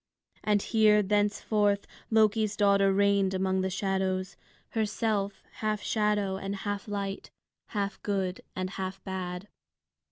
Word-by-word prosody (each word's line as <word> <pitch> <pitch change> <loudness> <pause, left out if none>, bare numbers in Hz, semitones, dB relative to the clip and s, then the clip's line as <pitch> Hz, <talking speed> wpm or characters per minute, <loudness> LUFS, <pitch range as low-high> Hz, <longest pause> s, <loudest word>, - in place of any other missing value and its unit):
And 210 -1 +2
here 215 -2 +4
thenceforth 205 0 +1 0.2
Loki's 215 -1 +3
daughter 200 -1 +4
reigned 200 -1 +3
among 190 0 +1
the 190 - 0
shadows, 190 0 -1 0.3
herself 210 -2 -1
half 215 -1 -1
shadow 210 -3 +1
and 195 +1 -4
half 205 +1 -4
light, 200 -1 -4 0.4
half 200 -2 -3
good 190 -3 -1
and 185 0 -3
half 190 0 -5
bad. 185 0 -4
200 Hz, 120 wpm, -29 LUFS, 190-210 Hz, 0.4 s, here